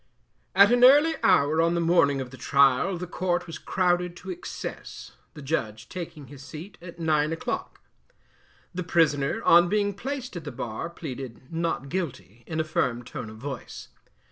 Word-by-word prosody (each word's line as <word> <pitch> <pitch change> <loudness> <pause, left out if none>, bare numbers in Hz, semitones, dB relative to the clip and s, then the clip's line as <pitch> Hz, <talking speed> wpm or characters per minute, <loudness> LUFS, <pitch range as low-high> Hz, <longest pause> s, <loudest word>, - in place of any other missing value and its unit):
At 200 +3 +7
an 245 0 +4
early 290 +5 +7
hour 160 -3 +4
on 170 +1 +2
the - - +1
morning 165 -5 +3
of 125 -1 -7
the - - -9
trial, 140 +7 +3
the 180 - -5
court 175 0 -1
was 165 - -8
crowded 180 -1 0
to - - -7
excess, 365 +2 -7 0.2
the 150 - -9
Judge 110 -7 -3
taking 170 -5 -7
his 140 0 -12
seat 160 +7 -9
at 170 -1 -10
nine 155 -2 +1
o'clock. 165 - -4 0.9
The 180 - -3
Prisoner, 150 -5 +1
on 175 +1 +6
being 205 0 +1
placed 255 +2 -5
at 175 - -5
the 145 - -6
bar, 120 +5 -5
pleaded 130 -4 -8
'Not 165 -5 -2
Guilty' 120 - -5
in 160 - -3
a - - +2
firm 125 -6 -1
tone 115 -1 -7
of 110 - -11
voice. 135 +1 -7
165 Hz, 170 wpm, -26 LUFS, 140-180 Hz, 0.9 s, At